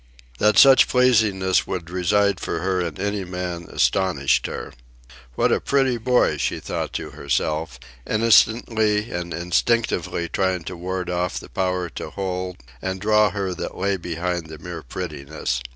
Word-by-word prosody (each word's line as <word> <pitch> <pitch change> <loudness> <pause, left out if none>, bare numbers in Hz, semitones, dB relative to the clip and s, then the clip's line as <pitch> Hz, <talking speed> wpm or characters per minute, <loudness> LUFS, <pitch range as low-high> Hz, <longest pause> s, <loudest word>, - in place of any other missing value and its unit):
That 105 0 +3
such 135 -1 +8
pleasingness 110 -7 +3
would 85 -2 -5
reside 100 +2 +2
for - - -3
her 95 0 0
in 85 -4 -4
any 100 0 -1
man 90 -2 -5
astonished 90 -8 +1
her. - - -6 0.6
"What - - +2
a - - +2
pretty 135 -3 +2
boy," 125 +2 +2
she - - -1
thought - - -4
to - - -4
herself, 80 +1 -2 0.3
innocently 110 0 +3
and 90 0 -4
instinctively 90 0 0
trying 95 -1 -1
to 90 - -6
ward 90 +1 -4
off 90 0 -1
the - - -12
power 90 -1 -1
to - - -7
hold 90 -2 -4 0.2
and 95 0 -3
draw 105 +1 +4
her 95 -3 -3
that - - -6
lay 100 +1 0
behind 85 -1 -3
the 80 0 -9
mere 85 0 -7
prettiness. 70 -4 -4
95 Hz, 150 wpm, -22 LUFS, 85-105 Hz, 0.6 s, such